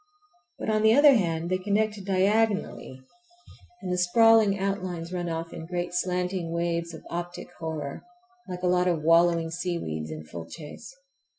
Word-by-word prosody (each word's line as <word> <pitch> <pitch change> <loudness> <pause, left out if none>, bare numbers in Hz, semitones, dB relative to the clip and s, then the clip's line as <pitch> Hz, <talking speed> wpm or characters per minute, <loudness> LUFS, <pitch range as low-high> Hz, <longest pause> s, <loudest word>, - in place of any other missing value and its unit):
But, - - -2
on 215 0 +2
the 220 +1 +5
other 290 0 +8
hand, 170 -6 0
they 185 - +1
connect 210 +1 0
diagonally, 195 -8 0 0.8
and 180 - -2
the 180 - 0
sprawling 220 +2 +5
outlines 185 -3 -3
run 175 -1 -2
off 165 0 -4
in 160 - -8
great 175 0 -3
slanting 180 -1 -1
waves 170 0 -2
of - - -12
optic 175 +1 -5
horror, 155 -4 -5 0.5
like 180 0 -6
a - - +2
lot 180 0 +2
of 165 -4 0
wallowing 165 0 +4
seaweeds 165 - -3
in 80 0 -7
full 80 +1 -8
chase. 150 - -10
180 Hz, 160 wpm, -27 LUFS, 165-195 Hz, 0.8 s, other